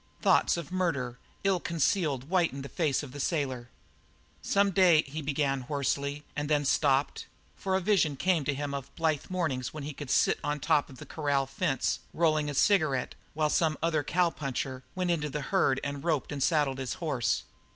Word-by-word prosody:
Thoughts - - +3
of 170 0 -6
murder, 140 -10 -1 0.2
ill 195 -2 +2
concealed, 160 -4 0
whitened 165 -3 0
the - - -7
face 150 -5 0
of 140 - -8
the 145 - -8
sailor. 130 -6 -2 0.7
"Some 200 0 +2
day 175 -5 +5
" - - -20
he 150 +3 -6
began 140 -2 0
hoarsely, 140 +2 -2
and 145 0 -2
then 145 -1 +2
stopped. 140 0 +1 0.3
For 190 -1 -1
a 190 - +1
vision 175 -7 +2
came 175 +1 +1
to 145 - +1
him 145 0 -3
of 140 -2 -5
blithe 160 -3 0
mornings 155 -8 -2
when 150 - -5
he 150 +1 -5
should 145 -2 -7
sit - - +3
on 145 0 -1
the 145 - -8
top 150 -2 +3
of 130 - -12
the - - -10
corral 145 -3 0
fence 135 -1 -1 0.2
rolling 155 -3 +2
a 145 - -4
cigarette, 155 -8 +2 0.2
while 155 -1 +1
some 160 -2 +2
other 160 -2 +2
puncher 140 -5 -1
went 180 -1 0
into 150 -3 -1
the 150 +1 -3
herd 135 -8 +3
and 140 -1 -4
roped 160 -5 0
and 145 -2 -4
saddled 145 -3 +2
his 130 -2 -3
horse. 150 -9 -1
150 Hz, 195 wpm, -29 LUFS, 140-170 Hz, 0.7 s, day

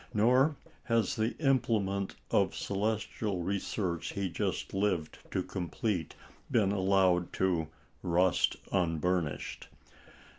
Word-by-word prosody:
Nor 125 +8 +4 0.3
has 115 -4 +1
the 110 +2 -1
implement 110 -9 +1 0.2
of - - +2
celestial 105 -2 -1
research 95 -2 -2
he 100 -2 -1
just - - -2
lived 95 -5 0
to - - -1
complete 90 - -2 0.3
been 100 -4 +3
allowed 95 -3 +3
to 90 -4 +1 0.3
"rust 90 +1 +2 0.2
unburnished." 85 -3 -1
95 Hz, 100 wpm, -31 LUFS, 90-110 Hz, 0.3 s, Nor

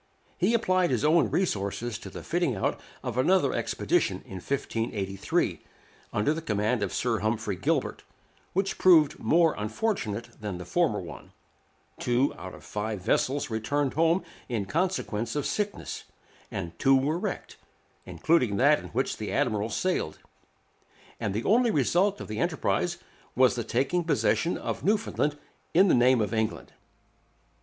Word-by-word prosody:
He 195 +6 +3
applied 185 -5 +2
his 130 +1 0
own 160 +2 +4
resources 110 - -1
to - - -9
the - - -9
fitting - - 0
out - - -1 0.2
of 125 - -2
another 150 -1 +3
expedition - - 0
in 95 - -8
1583, 105 -4 -2 0.5
under 150 +10 0
command 110 -2 0
of - - -1
Sir 115 -3 0
Humphrey 110 -2 -1
Gilbert, 90 - -1 0.5
which 195 +1 -1
proved 160 -5 +5
more 165 -1 +3
unfortunate 110 - -3
than 105 -4 -4
the 90 - -7
former - - +1
one; - - -10 0.7
two 125 +3 +1
out - - -8
of - - -14
five 105 0 -3
vessels 130 +6 0
returned 135 +5 0
home 165 +4 +2 0.3
in 110 -5 -1
consequence 145 - -1
of 145 - -1
sickness, 205 -1 -3 0.4
and 85 -3 -6
two 135 0 +5
were 150 +6 0
wrecked, - - -5 0.5
including 125 -11 +1
that 145 +3 +5
in - - -9
which 130 +3 -1
the 105 - -4
admiral 115 -6 0
sailed; 180 - -1 1.0
and 105 - -1
the 110 - -1
only 235 +4 +4
result 185 - +2
of - - -7
the 105 - -4
enterprise - - 0 0.4
was 130 0 +5
the 120 - -3
taking 135 +10 0
possession 165 +1 +1
of - - -4
Newfoundland 200 -8 +1 0.4
in 190 +2 +6
the - - +5
name 125 0 +5
of 105 - -1
England. 110 -1 -2
130 Hz, 150 wpm, -27 LUFS, 110-170 Hz, 1.0 s, in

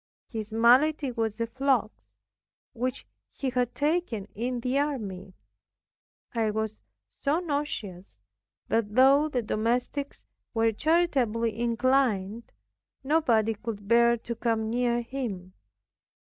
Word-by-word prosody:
His 220 -3 -5
malady 255 +5 +4
was 225 -2 -2
a 230 - +1
flux, 255 -2 +1 0.8
which 255 +2 -3 0.3
he 265 -2 -3
had 245 -1 -1
taken 295 - 0
in 240 +3 -3
the 255 +3 0
army. 200 -10 -3 1.0
It 220 -3 0
was 220 -1 -1 0.5
so 295 +4 +1
nauseous, 285 - -4 0.5
that 220 -2 0
though 275 +4 +6
the 250 -5 -1
domestics 245 +6 -2 0.3
were 225 0 +3
charitably 245 -6 +1
inclined, 235 -3 0 0.5
nobody 245 -7 +2
could 210 -2 -7
bear 235 +1 +5
to 235 +1 -5
come 225 -1 -1
near 240 0 +1
him. 220 -8 -5
235 Hz, 110 wpm, -27 LUFS, 220-270 Hz, 1.0 s, though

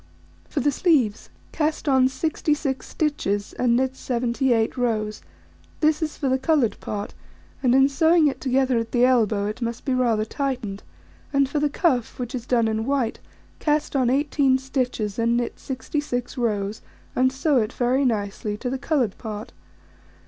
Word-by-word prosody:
For - - -1
the 290 +3 +2
sleeves: 265 - +1 0.2
Cast 310 0 -1
on 265 -2 +5
66 290 0 -1
stitches, 205 -10 -1
and 240 -1 +2
knit 260 +1 +1
78 240 -2 0
rows: 215 -4 -1 0.6
this 310 0 +2
is 310 -1 -2
for 280 - -1
the 260 0 +2
coloured 280 -5 +1
part, 205 -1 -5 0.5
and 255 -2 +3
in 270 0 +6
sewing 320 +3 +4
it 275 - -2
together 260 -2 +2
at 230 0 -5
the 245 0 +5
elbow, 220 -5 +2
it 215 +4 -4
must 235 0 -3
be 265 - +1
rather 235 -4 +2
tightened; 245 -6 -3 0.5
and 275 -1 +3
for 295 +2 -1
the 295 0 +1
cuff, 275 - 0
which 245 0 -5
is 245 -1 -5
done 235 -3 +3
in 220 +1 -1
white, 270 -5 0 0.4
cast 300 -1 0
on 255 -3 +3
18 275 0 +2
stitches 250 -6 -2
and 235 +1 +2
knit 240 -1 -3
66 260 -2 -3
rows, 210 -4 -1 0.3
and 260 +1 +3
sew 270 +2 +1
it 220 -1 +1
very 255 +3 +1
nicely 210 -3 -1
to 250 +3 -3
the 265 - -2
coloured 265 -8 0
part. 215 -2 -6
255 Hz, 165 wpm, -24 LUFS, 230-275 Hz, 0.6 s, in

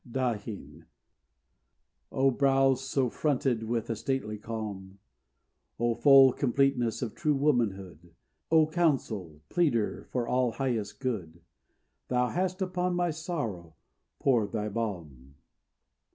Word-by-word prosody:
DAHIN 115 -5 -4 1.3
O 135 0 +3
brow, 135 0 +3
so 135 0 -1
fronted 130 -3 0
with 115 0 -2
a 115 - -2
stately 110 -4 -3
calm, 105 -3 -6 0.8
O 120 0 +2
full 135 0 +7
completeness 130 -3 +1
of 115 - -4
true 150 -1 0
womanhood, 100 - -1 0.4
O 160 -1 +5
counsel, 130 - -1
pleader 140 -11 0
for 120 -2 -2
all 125 -2 +1
highest 120 -6 -2
good, 90 - -4 0.7
Thou 125 0 +1
hast 185 +1 -1
upon 180 -1 -1
my 175 -1 +1
sorrow 115 - -5 0.4
poured 115 - +1
thy 105 -1 -2
balm! 85 - -5
120 Hz, 110 wpm, -29 LUFS, 105-140 Hz, 1.3 s, full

